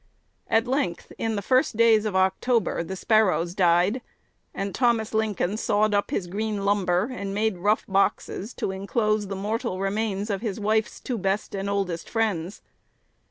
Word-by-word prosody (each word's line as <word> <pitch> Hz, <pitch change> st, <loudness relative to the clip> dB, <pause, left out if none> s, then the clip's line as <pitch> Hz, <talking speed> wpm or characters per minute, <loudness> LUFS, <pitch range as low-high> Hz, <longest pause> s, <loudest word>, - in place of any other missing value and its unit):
At 225 Hz, +1 st, +2 dB
length, 250 Hz, -9 st, -2 dB
in 225 Hz, -1 st, -1 dB
the 200 Hz, -, -3 dB
first 255 Hz, -1 st, +2 dB
days 225 Hz, -2 st, +5 dB
of 210 Hz, -3 st, -2 dB
October, 190 Hz, +2 st, +1 dB
the 190 Hz, +3 st, -5 dB
Sparrows 185 Hz, -5 st, +2 dB
died; 180 Hz, +6 st, +3 dB, 0.5 s
and 195 Hz, 0 st, -4 dB
Thomas 235 Hz, -3 st, +1 dB
Lincoln 215 Hz, -2 st, 0 dB
sawed 215 Hz, 0 st, +1 dB
up 205 Hz, 0 st, +1 dB
his 180 Hz, -, -1 dB
green 205 Hz, +2 st, -3 dB
lumber, 200 Hz, +2 st, +1 dB
and 200 Hz, -5 st, -4 dB
made 215 Hz, -3 st, 0 dB
rough 210 Hz, +4 st, +1 dB
boxes 200 Hz, +2 st, 0 dB
to -, -, -2 dB
enclose 210 Hz, +2 st, 0 dB
the 195 Hz, -, -4 dB
mortal 200 Hz, -1 st, -2 dB
remains 205 Hz, +1 st, -1 dB
of 195 Hz, -, -2 dB
his 220 Hz, -3 st, -3 dB
wife's 215 Hz, +1 st, 0 dB
two 245 Hz, -4 st, -4 dB
best 195 Hz, +2 st, -1 dB
and 195 Hz, 0 st, -3 dB
oldest 190 Hz, -4 st, -2 dB
friends. 205 Hz, -5 st, -1 dB
205 Hz, 160 wpm, -25 LUFS, 190-220 Hz, 0.5 s, days